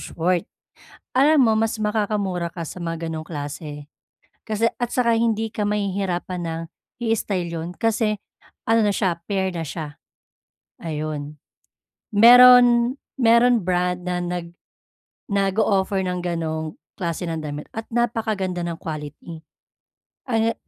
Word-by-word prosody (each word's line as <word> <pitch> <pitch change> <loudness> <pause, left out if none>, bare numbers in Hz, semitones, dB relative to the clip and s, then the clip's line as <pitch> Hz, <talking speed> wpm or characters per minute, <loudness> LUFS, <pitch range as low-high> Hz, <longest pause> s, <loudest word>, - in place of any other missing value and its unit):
short, 175 +3 -1 0.7
alam 290 +2 +5
mo 220 -2 +3
mas 225 0 0
makakamura 205 -4 -1
ka 170 - -6
sa 165 - -8
mga 165 -1 -4
ganong 160 -1 -5
klase 145 -1 -7 0.6
kasi 220 +1 0 0.2
at 240 - 0
saka 240 -2 +2
hindi 225 -1 0
ka 215 - -3
mahihirapan 195 -3 -2
ng 165 0 -3 0.4
i-style 200 -6 -1
'yon, 165 +1 -4
kasi 220 -2 +1 0.5
ano 225 0 +3
na 210 - +3
siya 180 -5 0
pair 190 -2 0
na 170 - -3
siya 150 -1 -7 0.8
ayun. 150 -2 -4 0.8
Mayro'n 245 +3 +7 0.2
mayro'n 235 -2 +4
brand 180 0 0
na 180 0 -1
nag 175 -1 -4 0.8
nag-o-offer 195 -1 +1
ng 180 -1 -2
ganong 160 - -3 0.2
klase 175 -2 -3
ng 160 -1 -3
damit 150 -1 -6
at 225 0 -6
napakaganda 220 -6 -1
ng 170 -1 -3
quality 155 +1 -7 0.9
ana 225 -1 +2
190 Hz, 125 wpm, -23 LUFS, 165-225 Hz, 0.9 s, Mayro'n